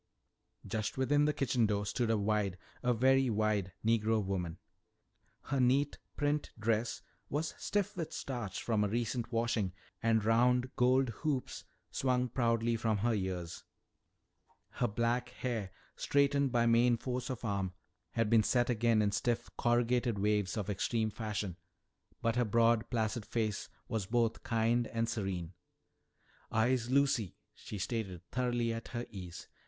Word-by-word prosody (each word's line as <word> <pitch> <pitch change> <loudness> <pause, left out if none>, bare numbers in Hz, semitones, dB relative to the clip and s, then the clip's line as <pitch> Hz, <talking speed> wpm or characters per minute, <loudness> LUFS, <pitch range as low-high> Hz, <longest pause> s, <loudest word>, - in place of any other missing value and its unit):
Just 110 +2 -3
within 145 +3 +3
the 150 - +3
kitchen 125 -5 +2
door 105 -1 0
stood 115 +3 -1
a 115 - +3
wide, 100 -2 0 0.2
a 125 - +2
very 130 +2 +4
wide, 105 -3 +1
Negro 110 -1 +3
woman. 90 -4 -2 0.9
Her 135 0 -1
neat 135 +3 +2 0.2
print 145 0 0
dress 110 +1 0 0.3
was 155 +3 -1
stiff 205 -2 -1
with 165 -4 -4
starch 120 -8 -4
from 110 -3 +1
a - - +2
recent 120 +2 -2
washing, 115 -5 0 0.3
and 110 -2 +2
round 125 +3 +3
gold 130 +1 +3
hoops 145 -5 -2 0.3
swung 125 -1 +1
proudly 115 -1 +1
from 110 -1 +1
her 115 +3 +1
ears. 90 -4 -3 1.1
Her 120 - 0
black 115 +3 0
hair, 120 -5 -3 0.3
straightened 140 -1 +2
by 120 -1 +3
main 120 +1 +4
force 125 +2 -3
of 125 -2 -4
arm, 100 -3 -1 0.4
had 115 -1 +1
been 115 0 +5
set 120 +3 +2
again 115 -1 +3
in 100 - +2
stiff, 120 +4 -1
corrugated 120 -1 +2
waves 105 0 +1
of 105 -3 -2
extreme 110 +2 0
fashion, 105 -5 -3 0.7
but 115 +1 +1
her 125 - +3
broad 115 +1 +3
placid 115 -1 -1
face 110 -1 -2 0.2
was 110 -6 -2
both 115 0 +1
kind 115 +1 +1
and 115 0 -1
serene. 95 -6 -3 1.0
"I'se 120 +2 +1
Lucy," 130 - +2 0.2
she 105 - -8
stated, 95 -3 -3
thoroughly 120 -2 0
at 115 0 -6
her 120 -1 -4
ease. 90 -5 -8
115 Hz, 145 wpm, -33 LUFS, 105-125 Hz, 1.1 s, been